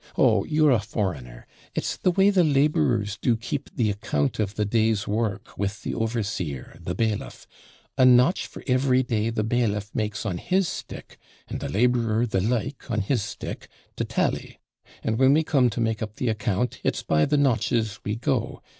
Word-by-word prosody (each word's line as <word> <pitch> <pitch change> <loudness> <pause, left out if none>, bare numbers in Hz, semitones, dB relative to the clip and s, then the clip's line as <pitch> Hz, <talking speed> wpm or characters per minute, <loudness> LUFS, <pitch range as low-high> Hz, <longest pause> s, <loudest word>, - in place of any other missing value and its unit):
Oh, - - +4
you're 155 -1 +3
a 120 - +4
foreigner; 70 - -4 0.3
it's - - -1
the - - +1
way 195 +3 +4
the 185 -3 +4
labourers 135 - +2
do 120 -3 +2
keep 135 +5 -4
the 110 -5 +1
account 75 -8 -1
of 105 -1 -1
the 105 - 0
day's 110 -1 +1
work 105 -1 -2
with 100 +2 -2
the - - -3
overseer, 105 - -3
the 90 - -4
bailiff; 110 0 -2 0.5
a - - +6
notch 125 +7 +5
for - - -11
every 130 0 +3
day 115 -3 0
the 115 -2 -1
bailiff 110 -3 -1
makes 105 0 -2
on 90 -5 -2
his 190 0 +1
stick, - - -8 0.3
and - - -5
the - - -4
labourer 115 - +2
the 100 -5 0
like 125 +6 -2
on 110 -3 0
his 110 +4 0
stick, 105 - -6 0.3
to - - -2
tally; - - -2 0.4
and 110 +1 -1
when 135 +1 +6
we 160 +2 +3
come 135 -5 +3
to 115 - -5
make 110 -2 0
up 110 -1 -5
the 125 - -1
account, 110 +1 -1
it's - - -1
by 75 0 +2
the 150 - +1
notches 115 -5 +1
we 105 - -2
go. 115 - -2
115 Hz, 185 wpm, -25 LUFS, 105-125 Hz, 0.5 s, a